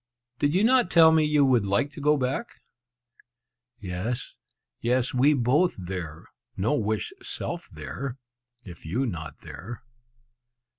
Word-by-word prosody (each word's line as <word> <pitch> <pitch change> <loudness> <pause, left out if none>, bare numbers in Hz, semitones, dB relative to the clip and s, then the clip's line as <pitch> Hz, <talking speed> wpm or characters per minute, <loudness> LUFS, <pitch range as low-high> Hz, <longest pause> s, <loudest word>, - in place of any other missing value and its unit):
"Did 145 +3 +1
you 195 - +3
not 245 -4 +4
tell 160 -1 +7
me 160 -1 +4
you 150 -2 +3
would 120 -6 +3
like 100 +9 +1
to 145 - -9
go 150 +1 +4
back?" 135 - -3 1.2
"Yes, 105 +6 -4 0.4
yes, 125 +1 +1
we 140 +4 +4
both 140 +8 +2
there; 90 -4 -6 0.3
no 100 +8 +1
wish 110 -7 -1
self - - -5
there, 135 -1 -6 0.5
if 85 -6 -11
you 110 +12 -1
not 80 - -6
there!" 120 +1 -9
125 Hz, 135 wpm, -26 LUFS, 100-150 Hz, 1.2 s, tell